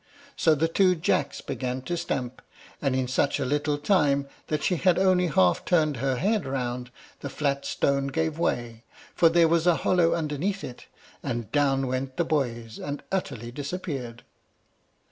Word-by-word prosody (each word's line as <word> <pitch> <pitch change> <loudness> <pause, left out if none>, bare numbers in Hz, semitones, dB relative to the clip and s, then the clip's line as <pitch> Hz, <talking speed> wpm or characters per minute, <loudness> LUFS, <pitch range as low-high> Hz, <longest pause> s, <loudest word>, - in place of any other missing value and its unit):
So 160 -2 +4
the 160 +3 +1
two 185 +2 +3
Jacks 145 -3 0
began 130 0 -4
to 175 - -2
stamp, 130 -7 -3 0.4
and 135 -3 +1
in 130 -1 0
such 135 +3 +1
a 140 - -1
little 145 +2 0
time 145 -3 +2 0.2
that 155 -1 -1
she 180 - +1
had 180 +1 +3
only 185 -1 +3
half 95 - +3
turned 155 -5 +2
her 135 +2 0
head 205 - +1
round, 125 -2 -3 0.3
the 140 - -5
flat 140 -1 -1
stone 140 0 0
gave 160 +3 -1
way, 120 -7 -2 0.3
for 165 - +5
there 170 0 +5
was 170 +1 +2
a 175 - +5
hollow 175 -2 +3
underneath 165 +5 -2
it, 125 - -9 0.3
and 120 -2 -4
down 135 -2 +2
went 130 +1 -3
the 170 - +1
boys, 120 -7 -2
and 145 0 -5
utterly 130 - -3
disappeared. 140 -4 -5
145 Hz, 165 wpm, -26 LUFS, 130-165 Hz, 0.4 s, for